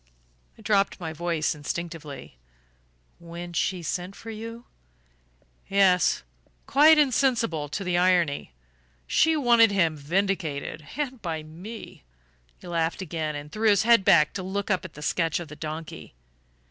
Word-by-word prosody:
I - - -16
dropped 200 -2 +1
my 160 -3 -5
voice 165 -1 -1
instinctively. 150 - -7 0.8
"When 170 +1 -8
she 180 +2 -1
sent 180 +4 -4
for 225 - -9
you?" 230 +2 -8 1.0
"Yes 195 -2 +3 0.4
quite 310 +3 +6
insensible 235 - +1
to 195 - -4
the 180 -1 +1
irony. 175 - +2 0.5
She 320 0 +3
wanted 235 -5 +5
him 170 -5 +2
vindicated 155 -2 -2
and 265 -5 -3
by 160 -4 -4
me!" 180 - -10 0.5
He - - -16
laughed 170 +1 -1
again, 155 -3 -3
and 145 +1 -8
threw 215 +1 -3
back - - +7
his 205 0 +4
head 230 -4 +5 0.3
to 195 - -4
look 200 +2 -3
up 185 - +1
at 185 - -10
the 150 - -9
sketch 165 +1 0
of 170 -3 -8
the 150 - -9
donkey. 155 - -7
175 Hz, 145 wpm, -26 LUFS, 160-215 Hz, 1.0 s, back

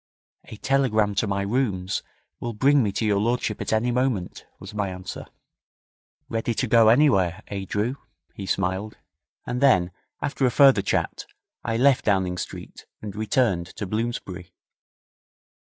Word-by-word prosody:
'A 110 - -10
telegram 110 -6 +1
to 100 +2 0
my 100 0 -1
rooms 100 -4 -1 0.4
will 120 - -4
bring 140 +6 +4
me 105 -4 0
to 105 +3 -2
your 100 -2 +2
lordship 115 -1 -1
at - - -3
any 110 +3 +1
moment,' 120 -7 -2
was - - -10
my 105 -2 -1
answer. 90 0 -7 1.0
'Ready 115 0 -2
to - - 0
go 115 -2 +5
anywhere 110 - +3
eh, 100 -1 -4
Drew?' 115 +6 -1 0.4
he 95 - -7
smiled; 95 +3 -2 0.5
and 125 +1 -3
then, 95 -10 +4 0.3
after 140 -1 -3
a - - +3
further 135 -3 +6
chat, - - -2 0.4
I 115 - -1
left 135 +1 +4
Downing 95 -3 +1
Street - - -8
and 105 -2 -7
returned 110 -6 +1
to 105 - -4
Bloomsbury. 100 -4 -4
110 Hz, 150 wpm, -24 LUFS, 95-125 Hz, 1.0 s, further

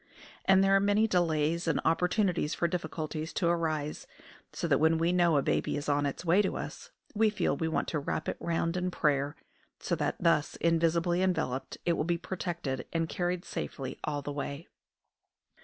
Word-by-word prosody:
And 190 0 +5
there 195 0 +4
are - - +6
many 205 +2 +3
delays 170 -2 +1
and 165 - +2
opportunities 180 -1 +1
for 170 - +1
difficulties 160 -2 -4
to 170 - 0
arise; 155 -3 -1 0.4
so - - -3
that - - +3
when 160 +1 +4
we 165 +2 +2
know 170 -3 +4
a 140 - +2
baby - - 0
is 145 - -5
on 145 0 +2
its 140 +5 -5
way 175 +5 +5
to 195 - -1
us - - -7 0.2
we 220 0 +3
feel 210 -9 0
we 160 +3 -1
want 160 - -1
to 155 - -1
wrap 150 +2 -3
it - - -2
round 165 0 -1
in 180 0 0
prayer, 145 -4 0 0.4
so - - -3
that, - - 0
thus 165 -3 +2
invisibly 170 +1 +2
enveloped, 160 -8 -1
it 170 - +3
will 165 - 0
be 170 +1 0
protected 170 -7 -4
and 165 -1 -1
carried 175 0 -2
safely 135 -3 -5
all 145 -1 -2
the 145 - -4
way. 140 +2 -5
165 Hz, 190 wpm, -30 LUFS, 150-180 Hz, 0.4 s, are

